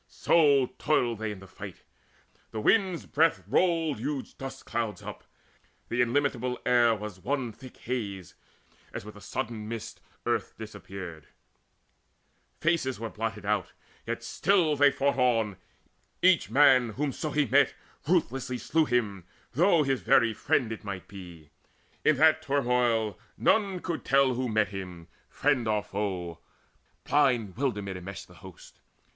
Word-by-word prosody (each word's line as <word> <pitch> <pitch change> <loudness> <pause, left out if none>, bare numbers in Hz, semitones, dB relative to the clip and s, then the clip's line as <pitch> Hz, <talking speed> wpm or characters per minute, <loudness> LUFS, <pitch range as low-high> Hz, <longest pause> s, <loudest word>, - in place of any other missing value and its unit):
So 140 -6 +3
toiled 120 -7 +1
they 110 -1 -2
in 100 -2 -9
the - - -11
fight: - - -10 0.7
the 110 - -5
wind's 185 - +2
breath 160 +2 +2
rolled 165 -7 +1
Huge 140 +2 -4
dust 135 0 -8
clouds 115 -2 -3
up; - - -8 0.7
the 120 +1 +1
illimitable 125 0 0
air 120 -2 +4
Was 105 -3 -7
one 125 +4 -2
thick 130 +4 -13
haze, 100 -7 -4 0.6
as - - -7
with 105 - -10
a 105 - -13
sudden 115 0 -4
mist: 115 -1 -6 0.2
Earth - - -1
disappeared, 90 -6 -9 1.3
faces 155 -7 0
were 115 -1 -5
blotted 110 -1 -4
out; 105 0 -1 0.3
Yet 115 0 -3
still 170 +2 +2
they 145 0 +6
fought 140 0 0
on; 115 -6 +2 0.7
each 180 - +4
man, 125 -2 +5
whomso 145 +3 -2
he 150 0 +1
met, 115 - +3 0.3
Ruthlessly 125 0 0
slew 160 +5 +1
him, 105 - -1 0.2
though 170 +3 +4
his 135 -2 0
very 115 -2 +4
friend 110 +2 0
It 110 - -6
might 100 -3 -6
be 85 -6 -12 0.5
in 155 - +4
that 160 +2 +5
turmoil 125 -7 +1 0.2
none 200 -4 +2
could 170 -3 -4
tell 135 -1 +3
Who 125 0 -2
met 110 -1 +2
him, 90 -4 -8 0.2
friend 120 -5 +1
or 105 -1 +1
foe: 95 -5 -4 0.6
blind 125 -9 +2
wilderment 105 -7 -2
Enmeshed 95 +2 -8
the 90 - -17
hosts. 90 +1 -14
120 Hz, 140 wpm, -28 LUFS, 105-140 Hz, 1.3 s, they